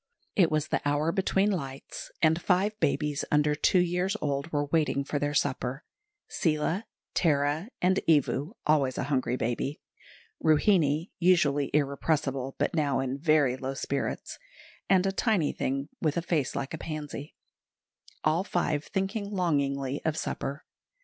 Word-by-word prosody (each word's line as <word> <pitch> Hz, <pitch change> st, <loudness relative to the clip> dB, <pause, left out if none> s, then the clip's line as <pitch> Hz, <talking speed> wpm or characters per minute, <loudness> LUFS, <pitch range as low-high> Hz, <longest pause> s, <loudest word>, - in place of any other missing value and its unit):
It 175 Hz, -5 st, +5 dB
was 155 Hz, 0 st, 0 dB
the -, -, 0 dB
hour 145 Hz, +3 st, +1 dB
between 195 Hz, +2 st, +2 dB
lights, 135 Hz, -8 st, -5 dB
and 160 Hz, +1 st, +4 dB
five 195 Hz, +4 st, +2 dB
babies 150 Hz, -1 st, 0 dB
under 150 Hz, 0 st, +3 dB
two 150 Hz, +5 st, +3 dB
years 180 Hz, +3 st, +1 dB
old 140 Hz, +2 st, -2 dB
were 145 Hz, -1 st, 0 dB
waiting 145 Hz, -2 st, +1 dB
for 145 Hz, +1 st, -2 dB
their 145 Hz, +1 st, -1 dB
supper 135 Hz, 0 st, -1 dB, 0.4 s
Seela, 160 Hz, +6 st, 0 dB, 0.3 s
Tara, 150 Hz, +3 st, +1 dB
and 185 Hz, +1 st, +4 dB
Evu 150 Hz, -, +2 dB
(always 140 Hz, -4 st, +2 dB
a -, -, -1 dB
hungry 130 Hz, -3 st, 0 dB
baby), 120 Hz, +5 st, -2 dB, 0.6 s
Ruhinie, 155 Hz, 0 st, +3 dB
usually 150 Hz, -6 st, +3 dB
irrepressible, 140 Hz, -2 st, 0 dB
but -, -, 0 dB
now 145 Hz, -5 st, +1 dB
in 135 Hz, +1 st, -2 dB
very 150 Hz, -4 st, +3 dB
low 135 Hz, +1 st, -4 dB
spirits, 140 Hz, +1 st, -3 dB, 0.5 s
and 190 Hz, -1 st, +4 dB
a 195 Hz, -, +2 dB
tiny 195 Hz, -5 st, +1 dB
thing 135 Hz, +2 st, -2 dB
with 155 Hz, 0 st, +1 dB
a 170 Hz, -, 0 dB
face 160 Hz, -6 st, 0 dB
like 135 Hz, -, -3 dB
a 160 Hz, -, -4 dB
pansy 150 Hz, -2 st, -6 dB, 0.9 s
all 160 Hz, +4 st, +2 dB
five 155 Hz, -6 st, -1 dB
thinking 200 Hz, +1 st, -2 dB
longingly 140 Hz, -7 st, 0 dB
of 160 Hz, -1 st, 0 dB
supper. 140 Hz, -1 st, -4 dB
150 Hz, 145 wpm, -28 LUFS, 140-175 Hz, 0.9 s, It